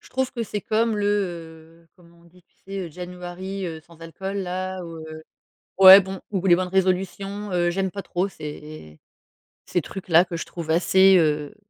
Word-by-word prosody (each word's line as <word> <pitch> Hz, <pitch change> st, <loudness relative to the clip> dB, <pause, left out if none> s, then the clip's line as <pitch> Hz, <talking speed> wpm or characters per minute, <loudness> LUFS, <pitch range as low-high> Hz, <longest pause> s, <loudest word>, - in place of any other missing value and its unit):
je -, -, -18 dB
trouve 260 Hz, 0 st, -2 dB
que 235 Hz, -3 st, -3 dB
c'est 210 Hz, -1 st, -4 dB
comme 220 Hz, +1 st, 0 dB
le, 205 Hz, 0 st, -1 dB, 0.8 s
heu, -, -, -33 dB
comment 170 Hz, -1 st, -21 dB
on -, -, -23 dB
dit? 175 Hz, +1 st, -22 dB
Tu -, -, -43 dB
sais? 195 Hz, -3 st, -5 dB
January, 180 Hz, +2 st, -7 dB
heu, 160 Hz, -1 st, -6 dB
sans 165 Hz, 0 st, -20 dB
alcool, 190 Hz, +4 st, -6 dB
là, 185 Hz, 0 st, -4 dB
ou, 165 Hz, -1 st, -9 dB
heu, 160 Hz, 0 st, -9 dB, 0.6 s
ouais 190 Hz, +1 st, +11 dB
bon 190 Hz, -1 st, -5 dB
ou 195 Hz, -1 st, -2 dB
les 175 Hz, -, +7 dB
bonnes 185 Hz, 0 st, -2 dB
résolutions. 195 Hz, +2 st, -1 dB
Heu, 175 Hz, -1 st, +1 dB
j'aime 190 Hz, +1 st, -2 dB
pas 200 Hz, -, -6 dB
trop 185 Hz, +1 st, -2 dB
ces 150 Hz, -, -10 dB, 0.7 s
ces 175 Hz, -, 0 dB
trucs-là 175 Hz, 0 st, +2 dB
que 170 Hz, -, -5 dB
je -, -, -5 dB
trouve 170 Hz, -2 st, -8 dB
assez, 190 Hz, +3 st, +5 dB
heu, 150 Hz, 0 st, 0 dB
180 Hz, 190 wpm, -23 LUFS, 170-195 Hz, 0.8 s, ouais